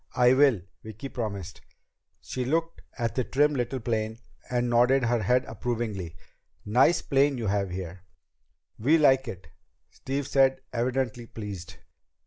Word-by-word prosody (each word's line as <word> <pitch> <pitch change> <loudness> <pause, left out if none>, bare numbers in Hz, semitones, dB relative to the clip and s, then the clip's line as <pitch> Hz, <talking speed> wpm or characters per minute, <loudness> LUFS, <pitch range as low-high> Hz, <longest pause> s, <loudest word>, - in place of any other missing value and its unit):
"I 125 0 +5
will," 130 -7 +4 0.2
Vicki 110 +5 -8
promised. 100 -8 -5 0.6
She 130 - -4
looked 165 +5 -1 0.2
at 115 -3 -1
the 130 - 0
trim 145 +4 +2
little 130 0 -2
plane, 110 -2 -2 0.3
and 125 -1 0
nodded 125 +3 +4
her 120 -1 +1
head 125 +5 +2
approvingly. 110 -9 -4 0.5
"Nice 125 +10 +3
airplane 140 0 +2
you 115 - -3
have 100 -1 0
here." 90 0 -6 0.8
"We 145 +9 +4
like 135 -4 +4
it," 90 -7 -8 0.4
Steve 140 +1 -4
said, 135 -1 +3
evidently 120 -1 -1
pleased. 100 -6 -7
120 Hz, 135 wpm, -27 LUFS, 110-135 Hz, 0.8 s, I